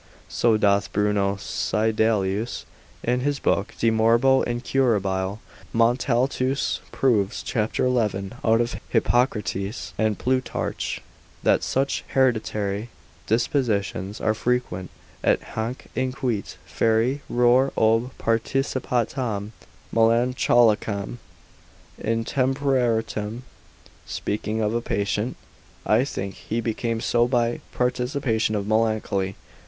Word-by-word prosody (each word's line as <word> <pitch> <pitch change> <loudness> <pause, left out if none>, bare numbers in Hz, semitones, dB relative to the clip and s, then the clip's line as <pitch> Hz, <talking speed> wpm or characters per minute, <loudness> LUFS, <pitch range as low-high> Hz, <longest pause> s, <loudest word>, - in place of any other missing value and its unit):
So 115 -2 +3
doth 100 -1 +2
Bruno 105 -1 +1
Seidelius 110 +1 0 0.4
in 125 +1 +1
his 140 +2 0
book 100 -5 0
de 115 - +2
morbo 115 +4 +4
incurab. 105 -6 0 0.4
Montaltus 125 +3 +1
proves, 105 -7 +1
cap. 110 -1 -1
11, 105 -6 0
out 115 0 +4
of 120 +1 -2
Hippocrates 110 -4 0
and 110 -2 +1
Plutarch, 130 0 -2 0.4
that - - +4
such 135 +1 0
hereditary 110 -4 +1 0.4
dispositions 110 -5 0
are 110 - +1
frequent, 120 -5 -1 0.3
et - - +3
hanc 115 +4 -3
(inquit) 125 -5 -2
fieri 115 +5 +1
reor 125 +2 +4
ob 115 +3 +3
participatam 115 -2 -1 0.4
melancholicam 115 -2 +3 0.9
intemperantiam 115 -2 0 0.7
(speaking 105 +1 -2
of 105 0 0
a 120 - 0
patient) 105 +2 -1 0.5
I 125 - +3
think 100 -8 -4
he 115 - -4
became 115 0 -2
so 120 0 +2
by 120 -2 0
participation 125 -3 0
of 100 -1 -1
Melancholy. 110 -3 0
115 Hz, 95 wpm, -24 LUFS, 105-125 Hz, 0.9 s, morbo